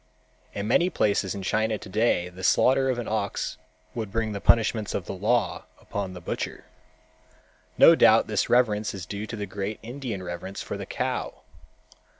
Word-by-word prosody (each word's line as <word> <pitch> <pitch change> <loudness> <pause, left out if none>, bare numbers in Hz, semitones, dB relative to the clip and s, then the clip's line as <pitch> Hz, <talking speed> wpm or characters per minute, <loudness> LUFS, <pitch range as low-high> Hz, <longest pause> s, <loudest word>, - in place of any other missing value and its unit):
In 100 +1 -3
many 175 +10 +3
places 100 - 0
in 100 - -6
China 110 +3 0
today 100 -3 0
the 90 +1 -11
slaughter 135 +7 +4
of 130 - 0
an 120 - -4
ox 105 -2 -2 0.3
would 110 -4 -4
bring 110 0 -1
the 100 -1 -5
punishments 110 -2 +2
of 90 - -3
the - - -5
law 110 +6 0
upon 100 -2 -5
the 90 - -8
butcher. 85 - -5 1.1
No - - +9
doubt - - +5
this - - -1
reverence 110 -4 +2
is 95 -2 -6
due 105 +2 -5
to 115 - -5
the 105 -2 -4
great 100 +2 -4
Indian 120 -5 -5
reverence 85 +2 -6
for - - -5
the - - -6
cow. - - -3
105 Hz, 170 wpm, -26 LUFS, 95-115 Hz, 1.1 s, No